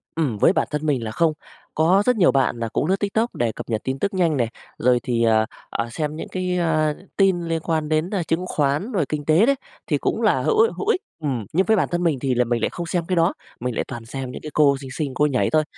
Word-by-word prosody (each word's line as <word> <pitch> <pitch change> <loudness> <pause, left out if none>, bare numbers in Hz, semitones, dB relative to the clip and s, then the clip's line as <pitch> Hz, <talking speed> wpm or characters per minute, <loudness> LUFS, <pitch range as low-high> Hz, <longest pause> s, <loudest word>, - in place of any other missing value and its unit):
Ừm, 140 -10 0
với 170 - +4
bản - - +1
thân 150 +1 -2
mình 135 -6 +1
là 110 - -4
không. 160 +6 +2 0.4
Có 180 +6 +3
rất 250 - +3
nhiều 180 - +5
bạn 135 -3 +1
là 115 - -2
cũng - - -1
lướt 190 - +3
Tiktok 220 +3 -1
để 120 -2 0
cập 110 - -9
nhật 110 -1 -1
tin 130 +1 -3
tức 200 - -1
nhanh 170 -6 +2
này, 120 -2 +1 0.3
rồi 125 0 +3
thì, 115 -2 0 0.5
ờ, 115 - -2
xem 150 +4 -3
những 160 - -6
cái, 180 -1 -2
ơ, 155 -3 +1 0.2
tin 190 -3 +3
liên 165 -1 -2
quan 160 -2 -1
đến, 155 +3 +1
a, 195 -5 -1
chứng 165 +3 -1
khoán 150 - 0
rồi 185 - +1
kinh 150 -1 -3
tế 160 +9 +5
đấy 275 - +3 0.3
thì - - +1
cũng - - -1
là - - +3
hữu 440 -1 +1
i 455 - +3
hữu 410 - -4
ích. 445 -4 +2 0.2
Ừm, 130 -9 -2
nhưng 190 +4 +3
với 220 - +4
bản - - +2
thân 175 0 0
mình 155 -7 +1
thì 130 -2 0
là 125 0 +2
mình 115 -1 -1
lại - - +1
không 175 - -5
xem 175 -1 -1
cái 185 - -1
đó, 170 +2 +3 0.3
mình 125 -1 -3
lại - - 0
toàn 115 -1 -7
xem 130 +1 -5
những - - -8
cái 155 - -7
cô 140 -2 +4
xinh 135 - -8
xinh 140 0 -3
cô 150 +3 +2
nhảy 140 -4 +1
thôi, 155 0 +3
155 Hz, 280 wpm, -22 LUFS, 130-180 Hz, 0.5 s, nhiều